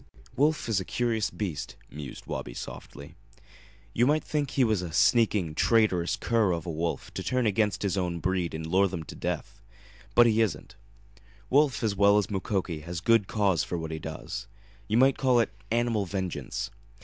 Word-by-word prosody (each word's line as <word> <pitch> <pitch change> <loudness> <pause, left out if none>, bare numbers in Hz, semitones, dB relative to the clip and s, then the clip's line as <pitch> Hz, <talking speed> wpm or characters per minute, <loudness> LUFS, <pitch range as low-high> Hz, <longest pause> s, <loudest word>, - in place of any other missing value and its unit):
"Wolf 150 +2 +2
is 110 -4 +1
a - - -3
curious 115 -2 0
beast," 85 -5 -4 0.2
mused 75 -2 -8
Wabi - - -5
softly. 70 +1 -9 0.8
"You 120 +2 +3
might 155 +2 +2
think 145 -3 -1
he 135 -1 +2
was 110 -5 +2
a 90 -2 -5
sneaking, 100 -2 +3
traitorous 95 -2 +2
cur 110 -6 +1
of 85 -2 -4
a 85 - -3
wolf 85 +1 -3
to - - -4
turn 125 -2 0
against 105 0 +1
his 100 -1 0
own 90 -2 -1
breed 90 -2 -1
and 80 0 -5
lure 95 +4 +3
them 90 -3 -5
to - - -10
death. - - -4 0.5
But 120 - +8
he 115 -1 +3
isn't. 110 0 -2 0.8
Wolf, 135 -4 +3
as 105 -3 +1
well 100 +1 +5
as 105 0 0
Mukoki, 95 -4 -2
has 85 +2 -5
good 115 +2 +3
cause 100 -6 +1
for 90 - -3
what 80 -1 -5
he 80 - -4
does. 85 +6 -6 0.4
You 110 - +1
might 135 +2 +4
call 125 -2 +4
it 115 - 0 0.2
animal 115 -3 +1
vengeance. 95 -1 -4
100 Hz, 185 wpm, -28 LUFS, 85-115 Hz, 0.8 s, But